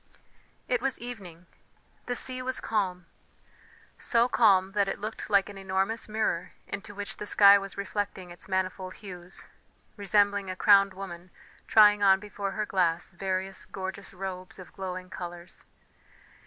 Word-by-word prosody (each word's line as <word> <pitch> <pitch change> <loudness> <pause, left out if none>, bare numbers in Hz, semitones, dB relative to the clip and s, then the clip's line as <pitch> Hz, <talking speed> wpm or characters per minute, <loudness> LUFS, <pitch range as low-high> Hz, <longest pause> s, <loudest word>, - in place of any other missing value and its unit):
It 250 -2 +1
was 270 -1 -1
evening; 195 -8 -9 0.6
the 245 - -1
sea 255 +1 0
was 260 0 -2
calm 185 -5 -1 0.9
so 235 0 +3
calm 195 -6 +4
that 200 -1 +1
it 195 - -2
looked 215 +1 -6
like 200 -2 +4
an 200 -1 -9
enormous 195 +4 -1
mirror 210 -5 -1
into 205 0 -7
which 205 0 -6
the 210 - -6
sky 200 -1 +7
was 195 -1 -8
reflecting 200 -2 -4
its 175 - -12
manifold 185 0 -2
hues, 180 -2 -9 0.5
resembling 200 -1 +2
a 185 - -3
crowned 195 0 +5
woman 185 -2 -8 0.4
trying 210 -1 +6
on 190 -1 +6
before 200 -1 -5
her 215 - -1
glass 175 -4 0
various 190 +1 -3
gorgeous 190 +1 -6
robes 185 -1 -6
of 185 - -12
glowing 185 -1 -6
colours. 175 0 -9
195 Hz, 145 wpm, -28 LUFS, 185-205 Hz, 0.9 s, sky